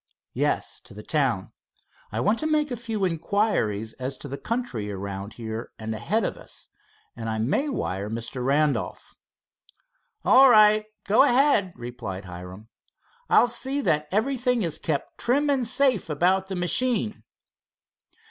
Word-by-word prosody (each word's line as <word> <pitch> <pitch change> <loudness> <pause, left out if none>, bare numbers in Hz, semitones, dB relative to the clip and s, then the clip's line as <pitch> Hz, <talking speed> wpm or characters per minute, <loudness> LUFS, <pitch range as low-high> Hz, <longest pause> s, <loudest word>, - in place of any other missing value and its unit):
"Yes, - - -1
to - - -12
the - - -9
town. - - 0 0.6
I - - -2
want 220 +2 +2
to 310 - -1
make 300 -2 +1
a - - -1
few 225 -4 -2
inquiries 165 - 0
as 130 +1 -4
to - - -9
the 140 - -5
country 175 - -3
around 100 +1 -6
here 110 0 -6
and 110 0 -4
ahead 205 - 0
of - - -2
us, - - -11 0.5
and 115 -1 -5
I 110 - -2
may 145 - 0
wire 100 - -3
Mr. 115 +3 -4
Randolph." 145 +2 0 1.1
"All 265 +1 +7
right, 215 -1 +6 0.2
go 210 +6 +5
ahead," 255 -8 +4
replied 120 -6 -7
Hiram. 90 +4 -10 0.6
"I'll - - +6
see 265 +3 -1
that 150 - +1
everything 250 +2 +1
is 165 -3 -2
kept 150 -3 -3
trim 285 +4 +2
and 260 -4 +1
safe 255 -7 +2
about 185 +5 +2
the 190 - -4
machine." 215 +5 0
180 Hz, 150 wpm, -25 LUFS, -, 1.1 s, All